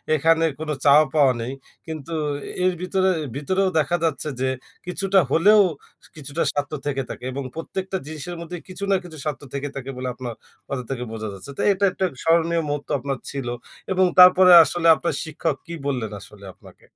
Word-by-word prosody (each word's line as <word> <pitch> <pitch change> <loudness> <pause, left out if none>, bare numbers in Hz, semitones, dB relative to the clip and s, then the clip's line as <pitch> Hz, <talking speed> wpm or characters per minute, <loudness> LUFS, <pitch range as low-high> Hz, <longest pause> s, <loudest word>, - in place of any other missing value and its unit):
এখানে 165 +2 +3 0.2
কোন 160 -1 -5 0.2
চাওয়া 150 +2 +7
পাওয়া 140 -4 +5
নেই। 120 +3 -4 0.4
কিন্তু 160 0 -6 0.5
এর 185 0 +3
ভিতরে 190 +1 +1 0.3
ভিতরেও 185 +7 0
দেখা 155 +4 +1
যাচ্ছে 155 -1 -1
যে, 130 - +1 0.4
কিছুটা 195 +1 +2
হলেও 210 +6 +6 0.5
কিছুটা 150 +2 -3
স্বার্থ 145 0 -3
থেকে 135 -2 -1
থাকে - - -8
এবং 140 +1 -4
প্রত্যেকটা 190 +3 -4
জিনিসের 160 +3 -6
মধ্যে 175 +1 -6
কিছু 185 +2 -6
না - - +5
কিছু 160 -3 -10
স্বার্থ 150 -2 -3
থেকে 140 +1 -3
থাকে 135 -1 -6
বলে 130 0 -4
আপনার 125 -2 -6 0.4
কথা 130 -2 -3
থেকে 125 -2 -3
বোঝা 110 -1 -5
যাচ্ছে। 100 +9 -9
তো, - - -2
এটা 195 - -4
একটা 190 - -1 0.2
স্মরণীয় 165 0 +2
মুহূর্ত 145 0 -3
আপনার 135 0 -3
ছিল। 135 -3 -5 0.4
এবং 185 0 +3
তারপরে 180 0 +8
আসলে 170 0 0
আপনার 170 - -2
শিক্ষক 160 -1 -2
কি 170 - -6
বললেন 125 -5 -1
আসলে 100 0 -13
আপনাকে? - - -18
155 Hz, 175 wpm, -23 LUFS, 140-180 Hz, 0.5 s, তারপরে